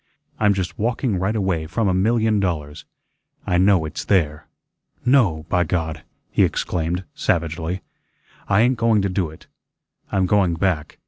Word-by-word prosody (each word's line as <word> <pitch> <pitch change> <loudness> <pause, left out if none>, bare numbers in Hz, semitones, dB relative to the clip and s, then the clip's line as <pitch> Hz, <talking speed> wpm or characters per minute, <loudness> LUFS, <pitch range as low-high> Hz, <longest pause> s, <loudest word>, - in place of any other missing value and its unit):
I'm 105 -2 +3
just 95 -2 -4
walking 115 -2 0
right 95 +4 0
away 95 -6 -1
from 115 +5 0
a 95 - +2
million 110 +2 +2
dollars. 75 -6 -3 0.6
I 90 - +1
know 95 -3 +4
it's 75 - -5
there. 75 -6 0 0.6
No, 105 - +3
by 90 0 +2
God!" 80 -2 -2 0.3
he - - +3
exclaimed, 85 +2 -1
savagely, 85 +2 -1 0.6
"I 95 - +4
ain't 125 +1 +3
going 115 -3 +3
to 100 - 0
do 90 -3 -1
it. 80 - -15 0.7
I'm 95 -1 +2
going 90 -3 +2
back. 80 -3 -1
95 Hz, 150 wpm, -22 LUFS, 80-105 Hz, 0.7 s, know